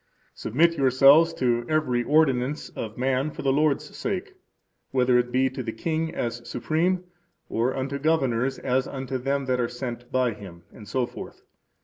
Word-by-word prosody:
Submit 165 +7 +1
yourselves 135 +5 +6
to 120 -2 +1
every 150 -6 +1
ordinance 145 -1 +1
of 110 -1 -7
man 130 +3 0
for - - -8
the 135 -1 +2
Lord's 150 0 0
sake, - - -3 0.6
whether 125 -1 +3
it 120 0 -1
be 130 +1 +3
to 130 0 -5
the 115 -2 -4
king 160 +7 -2
as 120 0 -3
supreme, 175 +8 0 0.5
or 120 +3 0
unto 135 +1 -3
governors 135 -4 +1
as 130 0 0
unto 130 -1 -4
them 135 +2 -1
that 130 -1 0
are 120 -1 0
sent 120 -1 -6
by 130 -2 +1
him, 90 -5 -12
etc. 115 +4 -4
130 Hz, 155 wpm, -25 LUFS, 120-145 Hz, 0.6 s, yourselves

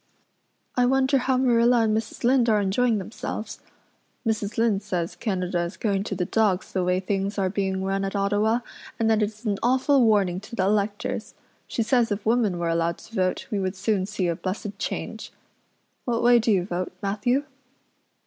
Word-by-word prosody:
I 250 -1 +3
wonder 265 +1 +3
how 255 0 +1
Marilla 240 -1 +4
and 215 -1 +2
Mrs. 220 +2 -4
Lynde 245 -1 +4
are 215 -1 +4
enjoying 215 +4 +2
themselves. 215 +2 -6 0.7
Mrs. 215 -2 -1
Lynde 225 -4 +2
says 180 -4 -3
Canada 185 -5 -2
is 170 +2 -4
going 200 -3 0
to 195 - -3
the 180 -1 -1
dogs 205 -2 +1
the 185 - +1
way 180 +1 +1
things 195 +2 -2
are 190 -2 +1
being 190 -1 -1
run 195 0 -1
at 195 +1 -3
Ottawa 205 +4 +1 0.4
and 225 -1 +2
that 220 0 +3
it's 215 +2 -3
an 205 -2 0
awful 260 +2 +3
warning 200 -5 +3
to 215 +4 -10
the 190 - +1
electors. 205 +1 -1 0.3
She 230 - -1
says 235 0 +2
if 205 0 -2
women 220 -5 +2
were 170 -1 -1
allowed 165 0 0
to 225 - -16
vote 185 -4 0
we 205 - 0
would 190 0 -2
soon 195 -1 0
see 205 -3 -1
a 170 - 0
blessed 195 +3 -5
change. - - -4 0.7
What 235 -2 0
way 240 0 +6
do 225 0 +1
you 185 -4 +2
vote, 180 -1 -3
Matthew?" 245 +7 +1
210 Hz, 185 wpm, -25 LUFS, 190-230 Hz, 0.7 s, way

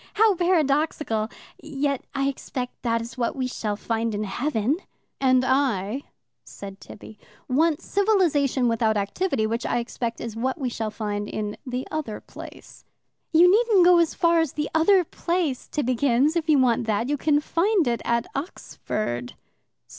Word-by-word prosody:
How 430 0 +5
paradoxical! 300 - +1 0.3
Yet 280 -2 -2
I 275 0 +1
expect 255 -2 -5
that 230 -1 0
is 230 +2 -10
what 235 - 0
we 260 -2 -2
shall 215 -4 -3
find 225 +1 -2
in 210 - -2
heaven." 240 +5 -1 0.4
"And 255 -1 +3
I," 260 -3 0 0.4
said 195 -1 -10
Tibby, 210 +1 -12 0.3
"want 305 +4 +1
civilization 335 - +2
without 225 -2 +1
activity, 220 - -1
which, 230 +2 -2
I - - 0
expect, 235 0 -3
is 230 -2 -6
what 255 +3 -1
we 260 -3 -1
shall 225 -2 -3
find 205 -1 -4
in 210 -1 -4
the 250 +1 -3
other 295 -9 -4
place." - - -12 0.5
"You 340 +2 +6
needn't 425 -4 +4
go 355 -1 +7
as 335 -2 +1
far 335 -1 +3
as 325 -4 0
the 300 0 -3
other 360 +4 +4
place, 335 -5 -2
Tibbi 255 -4 0
kins, 275 +5 +2
if 325 -1 -1
you 300 - +6
want 240 -3 +2
that. 220 +2 0
You 290 - +1
can 290 +1 +2
find 350 - +1
it 235 -1 0
at 235 0 0
Oxford." 215 - -4
260 Hz, 160 wpm, -24 LUFS, 230-315 Hz, 0.5 s, go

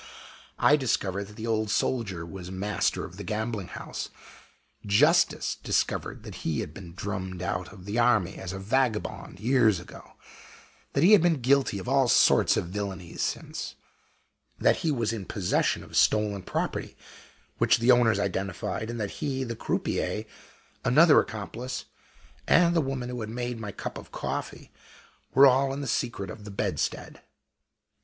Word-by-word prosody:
I 150 - +5
discovered 100 -7 -1
that 105 +1 -14
the 110 - -6
Old 110 -2 0
Soldier 100 -7 -1
was 90 +1 -8
the 95 - -7
master 100 0 -1
of - - -11
the - - -6
gambling 110 -3 -3
house - - -6 0.7
justice 145 - +3
discovered - - -1
that - - -8
he 80 - -1
had - - -7
been 90 -2 -10
drummed 95 -2 -4
out 90 -1 -3
of 95 -3 -13
the 105 +4 -1
army 110 -6 +3
as 95 - -5
a 95 - -5
vagabond 110 -2 -1
years 115 -4 +3
ago; 90 - -13 0.8
that 140 - +2
he 185 - +7
had 210 - +8
been 165 -4 +2
guilty 130 -3 +2
of 100 - -7
all 135 0 +3
sorts - - +5
of 85 - -2
villainies 95 -4 -5
since; - - -3 0.8
that - - +4
he 165 - -1
was 115 -5 0
in 105 -4 -5
possession 95 -2 0
of - - -11
stolen 105 -2 +3
property, - - -3 0.6
which - - +4
the 120 +2 +4
owners 120 -4 +4
identified; 100 +2 -2
and 120 0 -4
that 105 -2 -2
he, 135 -2 -1
the 115 -2 -4
croupier, - - -2 0.6
another - - +6
accomplice, 125 +3 -4 0.6
and 170 0 +5
the 165 - +4
woman 135 -3 -3
who 125 -1 -5
had 110 - -5
made 120 0 -4
my 105 -2 -5
cup - - -6
of - - -14
coffee, - - -5 0.6
were 135 +2 +9
all 135 +1 +4
in 140 +1 -4
the - - -4
secret 110 -6 -2
of 105 - -10
the 105 - -8
bedstead. 100 - -3
110 Hz, 165 wpm, -27 LUFS, 95-125 Hz, 0.8 s, were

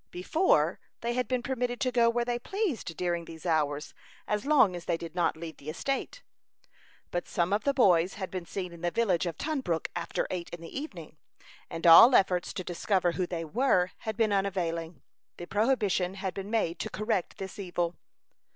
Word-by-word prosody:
Before, 315 - +2 0.2
they 235 +1 -1
had 250 +1 -1
been 255 -2 -1
permitted 245 -2 -2
to 255 -2 +1
go 235 -1 +4
where 235 0 0
they 240 0 -1
pleased 315 - -3
during 175 -1 -1
these 160 0 -11
hours, 150 -3 0 0.3
as 210 +5 -1
long 255 -11 +5
as 175 - -7
they 170 - 0
did 165 0 -8
not 175 -3 +1
leave 160 -1 -8
the 145 - -8
estate. 275 - -3 0.9
But 175 - -2
some 175 +2 0
of 205 - 0
the 280 - +3
boys 180 -8 +4
had 190 -2 -5
been 180 -2 -5
seen 180 -1 -5
in 170 - -12
the 175 - +1
village 185 -4 +1
of 165 -2 -4
Tunbrook 265 - -2
after 170 -1 -2
eight 175 -2 -4
in 175 - -8
the 165 - -10
evening; 180 - -7 0.5
and 165 +1 -5
all 200 +10 +10
efforts 180 -2 +3
to 185 - -4
discover 180 +1 0
who 180 +1 -2
they 165 -2 -4
were 185 - +2
had 220 -1 -5
been 220 -3 +2
unavailing. 170 -6 -2 0.3
The 175 - -6
prohibition 205 -3 +1
had 190 -1 -3
been 195 +1 -6
made 195 -7 0
to - - -3
correct 215 -3 -2
this 190 +1 -7
evil. 175 -3 -2
185 Hz, 195 wpm, -29 LUFS, 170-235 Hz, 0.9 s, all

